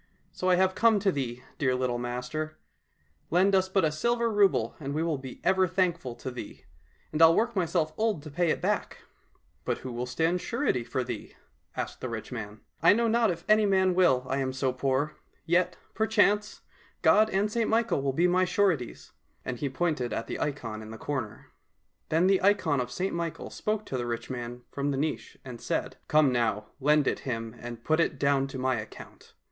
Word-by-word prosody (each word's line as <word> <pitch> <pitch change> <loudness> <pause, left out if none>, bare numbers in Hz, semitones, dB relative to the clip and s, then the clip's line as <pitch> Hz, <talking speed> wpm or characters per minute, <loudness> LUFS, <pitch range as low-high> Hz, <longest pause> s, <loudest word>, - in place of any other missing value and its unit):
So 185 - -1
I 180 - +6
have 190 +1 +3
come 225 +1 +4
to 195 -1 +3
thee, 125 -5 -4 0.2
dear 130 -3 +2
little 125 -1 -1
master; 125 +6 -4 0.7
lend 185 +4 +3
us 190 -1 +3
but 190 -2 +2
a 155 - +1
silver 235 +8 0
rouble 195 - +3
and 140 -1 -4
we 160 - 0
will 160 -4 -1
be 130 -2 -9
ever 190 -1 +3
thankful 170 -8 -1
to 130 - -6
thee, 120 -4 -9 0.5
and 155 - -1
I'll 165 0 +8
work 235 +1 +1
myself 160 -4 0
old 215 -9 0
to 155 - -9
pay 175 +3 +1
it - - -1
back." - - -1 0.2
— - - -38
" 75 +1 -40
But - - -1
who 130 - -4
will 120 +1 -3
stand 165 +7 0
surety 235 - 0
for 120 +2 -2
thee? 120 -3 -7 0.2
" - - -32
asked - - -4
the 130 - -3
rich 115 +1 -6
man. 105 -3 -6
— - - -47
*' - - -39
I - - +7
know 235 +2 +2
not 230 0 +3
if 170 -1 -4
any 215 0 +5
man 190 -1 +3
will, 130 -9 +3
I 135 - -1
am 130 -1 -1
so 130 -1 0
poor. 135 +3 -1 0.3
Yet, 175 +2 +2 0.2
perchance, 210 -1 +2 0.4
God 210 +7 +5
and 205 +1 0
St 230 0 0
Michael 225 -9 +2
will 135 0 0
be 170 +7 +2
my 180 +1 +3
sureties," 180 - 0 0.3
and 125 -2 -4
he 140 - -1
pointed 135 -4 -1
at - - -2
the - - -5
ikon 115 -7 -3
in 110 - -10
the 110 - -8
corner. 130 -2 -5 0.6
Then 165 +3 +3
the 190 0 +4
ikon 185 -9 +3
of 125 - -4
St 180 +11 -2
Michael 170 -1 -4
spoke 215 0 -2
to 130 - -3
the 120 - -3
rich 120 +2 -4
man 120 -1 -6
from 140 0 -2
the 140 - -1
niche 150 +2 -3
and 125 -3 -8
said, - - -2
" - - -41
Come 150 -3 +4
now! 110 -4 -1
lend 150 +1 +3
it - - 0
him, 115 -3 -4
and 120 -1 -8
put 155 +1 +2
it 165 -3 +1
down 140 0 +2
to 135 - -7
my 130 -1 0
account. 110 0 -10
150 Hz, 220 wpm, -28 LUFS, 125-185 Hz, 0.7 s, I'll